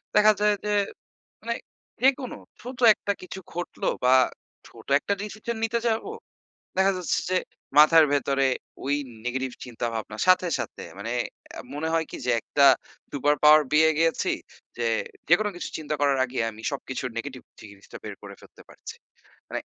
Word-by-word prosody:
দেখা 210 Hz, +1 st, +7 dB
যায় 210 Hz, 0 st, +3 dB
যে 210 Hz, -, 0 dB, 0.7 s
মানে -, -, -2 dB, 0.5 s
যেকোনো, 265 Hz, -1 st, +2 dB, 0.2 s
ছোট 250 Hz, +1 st, -8 dB, 0.2 s
একটা 200 Hz, -1 st, -2 dB
কিছু 185 Hz, -, -8 dB
ঘটলো 175 Hz, 0 st, -3 dB, 0.2 s
বা 130 Hz, +1 st, +6 dB, 0.5 s
ছোট 115 Hz, -1 st, -16 dB
একটা 200 Hz, -, -3 dB
decision 215 Hz, +2 st, -5 dB
নিতে 230 Hz, +1 st, 0 dB
যাবো, 225 Hz, -, -1 dB, 0.7 s
দেখা 195 Hz, +1 st, +4 dB
যাচ্ছে 180 Hz, -, 0 dB
যে, 185 Hz, -, +2 dB, 0.4 s
মাথার 155 Hz, +1 st, +8 dB
ভেতরে 135 Hz, -1 st, +2 dB, 0.4 s
ওই 140 Hz, +1 st, +1 dB, 0.3 s
negative 130 Hz, 0 st, -2 dB
চিন্তাভাবনা 115 Hz, -3 st, -4 dB
সাথে, 185 Hz, -1 st, +5 dB
সাথে -, -, -6 dB, 0.2 s
মানে -, -, -4 dB, 0.4 s
অ্যা -, -, -8 dB
মনে 160 Hz, +2 st, -2 dB
হয় 165 Hz, -1 st, +1 dB
কি -, -, -6 dB
যে -, -, +2 dB
একটা 140 Hz, -1 st, +3 dB, 0.5 s
super 145 Hz, +1 st, +2 dB
power 155 Hz, 0 st, +8 dB
পেয়ে 160 Hz, +1 st, +6 dB
গিয়েছি 165 Hz, 0 st, +2 dB, 0.5 s
যে, 120 Hz, -1 st, -1 dB, 0.4 s
যেকোনো 205 Hz, +5 st, +4 dB
কিছু -, -, -5 dB
চিন্তা 155 Hz, -1 st, -4 dB
করার 140 Hz, -2 st, +3 dB
আগেই 125 Hz, -2 st, -2 dB
আমি 110 Hz, +1 st, -13 dB
সবকিছুর 130 Hz, -2 st, -4 dB
negative 130 Hz, 0 st, -7 dB
জি -, -, -13 dB
জিনিসটা 100 Hz, -, -13 dB
বের -, -, -6 dB
করে -, -, -9 dB
ফেলতে -, -, -17 dB
পারছি। -, -, -10 dB, 0.6 s
মানে -, -, -3 dB
155 Hz, 160 wpm, -26 LUFS, 130-200 Hz, 0.7 s, মাথার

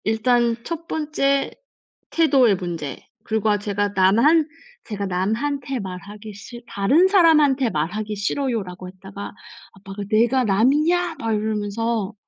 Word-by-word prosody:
일단 235 Hz, +2 st, +2 dB
1 335 Hz, 0 st, -6 dB
번째 285 Hz, -3 st, 0 dB, 0.6 s
태도의 275 Hz, -10 st, +3 dB
문제. 170 Hz, -7 st, -5 dB, 0.3 s
그리고 220 Hz, -1 st, 0 dB
제가 205 Hz, 0 st, -1 dB
"남한 235 Hz, -, +4 dB, 0.4 s
제가 205 Hz, -2 st, -4 dB
남한테 245 Hz, +9 st, -2 dB
말하기 200 Hz, +2 st, -8 dB
싫 235 Hz, +4 st, -11 dB
다른 275 Hz, -, +3 dB
사람한테 305 Hz, -, +4 dB
말하기 210 Hz, +6 st, -3 dB
싫어요."라고 205 Hz, -5 st, -3 dB
했다가 195 Hz, +2 st, -9 dB, 0.4 s
"아빠가 195 Hz, +1 st, -8 dB
내가 235 Hz, +4 st, +3 dB
남이냐?" 305 Hz, -, +2 dB
막 225 Hz, -1 st, -1 dB
이러면서. 215 Hz, 0 st, -2 dB
220 Hz, 270 characters per minute, -22 LUFS, 200-275 Hz, 0.6 s, 남한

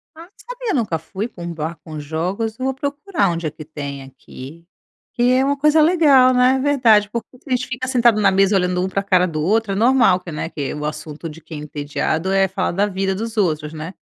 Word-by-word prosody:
Ah, 320 Hz, -, -12 dB
não 355 Hz, -, -23 dB
sabia, -, -, -5 dB
nunca 205 Hz, -, -1 dB
fui 195 Hz, +6 st, -5 dB
pra 175 Hz, -7 st, -11 dB
um 170 Hz, -, -4 dB
bar 160 Hz, +1 st, -4 dB
com 155 Hz, -2 st, -8 dB
jogos. 180 Hz, +9 st, -3 dB
Vou 265 Hz, +1 st, -1 dB
procurar 285 Hz, -, -1 dB
onde 165 Hz, -1 st, -3 dB
é -, -, -4 dB
que 155 Hz, -, -11 dB
tem 140 Hz, -3 st, -7 dB
aqui. 135 Hz, +4 st, -12 dB, 0.5 s
Que 245 Hz, +1 st, +3 dB
é 260 Hz, +1 st, +3 dB
uma 285 Hz, 0 st, 0 dB
coisa 300 Hz, +2 st, +4 dB
legal, 290 Hz, -6 st, +5 dB
né. 255 Hz, +1 st, +3 dB
Verdade, 235 Hz, -7 st, +3 dB
porque 235 Hz, +2 st, -6 dB
se -, -, -30 dB
a -, -, -8 dB
gente 250 Hz, 0 st, 0 dB
fica 255 Hz, +1 st, -4 dB
sentado 235 Hz, -4 st, +3 dB
na 195 Hz, -1 st, +4 dB
mesa 195 Hz, +1 st, +3 dB
olhando 180 Hz, -1 st, +1 dB
um -, -, 0 dB
pra 195 Hz, +1 st, -1 dB
cara 185 Hz, -2 st, +3 dB
do 155 Hz, -3 st, -3 dB
outro, 215 Hz, +4 st, +1 dB
é -, -, -2 dB
normal 235 Hz, -4 st, +4 dB
que, 180 Hz, -2 st, -9 dB
né, 150 Hz, +2 st, -4 dB
que 145 Hz, -5 st, -4 dB
o 150 Hz, 0 st, -5 dB
assunto 150 Hz, +1 st, -6 dB
de 160 Hz, +2 st, -12 dB
quem 155 Hz, -1 st, -9 dB
é -, -, -7 dB
entediado, 150 Hz, +4 st, -2 dB
é 195 Hz, 0 st, +3 dB
falar 190 Hz, 0 st, -2 dB
da 195 Hz, +4 st, +1 dB
vida 195 Hz, -1 st, -2 dB
dos 225 Hz, +2 st, -5 dB
outros, 155 Hz, -5 st, 0 dB
né. 160 Hz, +4 st, -7 dB
195 Hz, 240 wpm, -20 LUFS, 160-250 Hz, 0.5 s, legal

